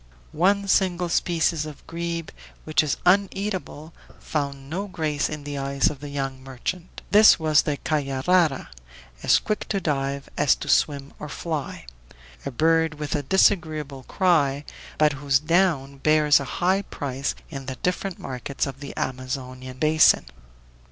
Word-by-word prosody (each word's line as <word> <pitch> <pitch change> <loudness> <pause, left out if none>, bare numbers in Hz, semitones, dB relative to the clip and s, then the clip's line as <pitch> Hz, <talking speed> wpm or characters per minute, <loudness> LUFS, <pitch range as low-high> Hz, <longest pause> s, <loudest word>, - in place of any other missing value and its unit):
One 200 +5 +2
single 180 -2 +2
species 165 -2 +1
of 150 -2 -11
grebe, 170 -1 -4 0.3
which 155 -2 +2
is 150 -3 -1
uneatable, 190 -4 0 0.2
found 140 -3 -4
no 185 +7 -4
grace 155 -6 -1
in 150 -1 -6
the 145 -1 -5
eyes 140 0 +1
of 145 - -10
the 145 +1 -8
young 135 -2 -4
merchant; 135 +7 -6
this 210 +2 +8
was 155 -2 +3
the 145 -1 -2
"caiarara," 150 +2 +1 0.5
as - - +5
quick 215 -1 -3
to 200 - 0
dive 140 -4 -2
as 145 -2 +4
to - - -8
swim 140 -2 +1
or 150 - -7
fly; 155 - -5 0.6
a - - -1
bird 160 +3 +2
with 150 -1 -4
a 150 - 0
disagreeable 155 -4 +1
cry, 150 -7 +2 0.3
but 150 -1 +4
whose 140 -1 +2
down 150 -3 +1
bears 150 0 +4
a 140 - -5
high 185 +8 +1
price 140 -7 -4 0.2
in 135 -3 -7
the 130 - -4
different 180 0 -1
markets 130 +1 -4
of 135 -1 -7
the 140 -1 -9
Amazonian 130 0 -5
basin. 155 - +4
150 Hz, 150 wpm, -24 LUFS, 140-170 Hz, 0.6 s, this